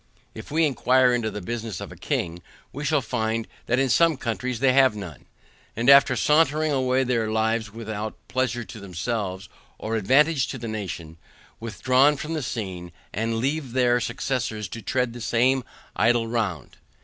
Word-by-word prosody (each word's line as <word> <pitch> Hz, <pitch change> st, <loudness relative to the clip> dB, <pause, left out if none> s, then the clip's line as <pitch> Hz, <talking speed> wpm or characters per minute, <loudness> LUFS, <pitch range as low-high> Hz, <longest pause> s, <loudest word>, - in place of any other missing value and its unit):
If -, -, -10 dB
we 160 Hz, +2 st, +2 dB
inquire 130 Hz, -2 st, +3 dB
into 120 Hz, -2 st, 0 dB
the 105 Hz, -, -6 dB
business 115 Hz, -2 st, -4 dB
of -, -, -7 dB
a -, -, -10 dB
king, 85 Hz, 0 st, -3 dB, 0.3 s
we 145 Hz, -, -5 dB
shall 145 Hz, -2 st, +1 dB
find 110 Hz, -1 st, -2 dB, 0.2 s
that 120 Hz, -, +2 dB
in 135 Hz, 0 st, +2 dB
some 165 Hz, +3 st, +3 dB
countries 125 Hz, -1 st, -3 dB
they 135 Hz, 0 st, +4 dB
have 130 Hz, -4 st, +5 dB
none; 90 Hz, -9 st, -9 dB, 0.5 s
and 120 Hz, +5 st, +4 dB
after 140 Hz, 0 st, +7 dB
sauntering 155 Hz, 0 st, +3 dB
away 130 Hz, -1 st, +2 dB
their 115 Hz, -3 st, 0 dB
lives 110 Hz, -1 st, 0 dB
without 110 Hz, -1 st, -5 dB
pleasure 130 Hz, -2 st, -1 dB
to 105 Hz, +1 st, -10 dB
themselves 95 Hz, 0 st, -4 dB, 0.3 s
or 110 Hz, +1 st, -3 dB
advantage 135 Hz, +7 st, +3 dB
to -, -, -5 dB
the 115 Hz, -2 st, -6 dB
nation, 90 Hz, -7 st, -6 dB, 0.4 s
withdraw 130 Hz, +5 st, +3 dB
from 155 Hz, +3 st, -5 dB
the 155 Hz, -, -2 dB
scene, 95 Hz, -8 st, -5 dB, 0.2 s
and 115 Hz, +2 st, -1 dB
leave 135 Hz, +1 st, -2 dB
their 125 Hz, -1 st, +3 dB
successors 120 Hz, -3 st, -2 dB
to 115 Hz, -, -7 dB
tread 125 Hz, +4 st, -1 dB
the 120 Hz, -, -8 dB
same 125 Hz, +3 st, +2 dB, 0.3 s
idle 115 Hz, +4 st, +2 dB
round. 105 Hz, -, -3 dB
120 Hz, 170 wpm, -24 LUFS, 110-130 Hz, 0.5 s, after